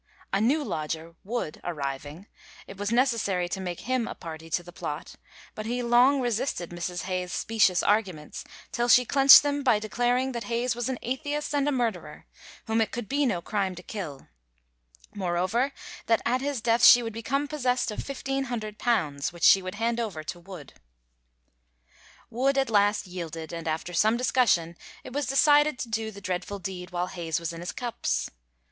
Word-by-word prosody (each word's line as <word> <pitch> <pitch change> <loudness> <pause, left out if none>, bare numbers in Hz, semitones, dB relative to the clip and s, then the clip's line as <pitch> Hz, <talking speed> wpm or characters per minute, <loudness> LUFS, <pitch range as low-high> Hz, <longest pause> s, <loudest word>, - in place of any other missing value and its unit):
A 195 - +2
new 285 +7 +2
lodger, 160 - -4
Wood, 210 -7 -4
arriving, 145 +1 -5 0.4
it 195 - -10
was 205 +2 -3
necessary 230 -8 +1
to 190 - -3
make 175 -2 -5
him 255 +1 -1
a - - -6
party 160 -1 -9
to 175 +2 -1
the 175 - -12
plot, - - -6 0.4
but 215 0 -6
he 245 +1 -2
long 245 +4 +5
resisted 240 -7 -2
Mrs. 175 0 -4
Hayes's 185 -1 -3
specious 200 -5 +2
arguments, 190 -8 -1 0.3
till 240 0 0
she 250 +1 +7
clenched 275 +2 +8
them 290 0 -1
by 250 -6 +4
declaring 245 +4 0
that 235 -2 -5
Hayes 240 +1 0
was 240 +1 -2
an 260 - -2
atheist 290 +4 -3
and 285 0 +1
a - - +2
murderer, 215 - -3 0.4
whom 225 0 +1
it 220 - +1
could 240 -3 -5
be 280 0 +1
no 180 -7 -1
crime 195 -3 -1
to 180 - -10
kill; 170 -11 -7 0.9
moreover 190 +8 0 0.4
that 225 - +2
at 250 +2 +1
his 280 -3 -2
death 230 +1 +2
she 245 - +9
would 225 -1 -5
become 275 +6 -1
possessed 255 -5 0
of 210 - -6
£1,500, 235 - -2
which 170 0 -10
she 195 - +7
would 185 +1 -6
hand 230 +2 -1
over 200 -9 -3
to 175 +3 -6
Wood. 175 -5 -11 1.6
Wood 270 +4 +1
at 270 -3 +1
last 205 0 +3
yielded, 165 -3 -7
and 165 -1 -5
after 160 +3 -3
some 215 +6 +3
discussion 225 -10 +2 0.3
it - - -10
was 290 -2 -1
decided 290 +2 +4
to 240 - -5
do 220 0 -2
the 200 -2 -11
dreadful 185 +1 -3
deed 185 -1 -6
while 175 -1 -2
Hayes 170 -3 -3
was 170 0 -4
in 165 - -8
his 175 - -4
cups. 240 -2 -2
215 Hz, 180 wpm, -27 LUFS, 175-250 Hz, 1.6 s, she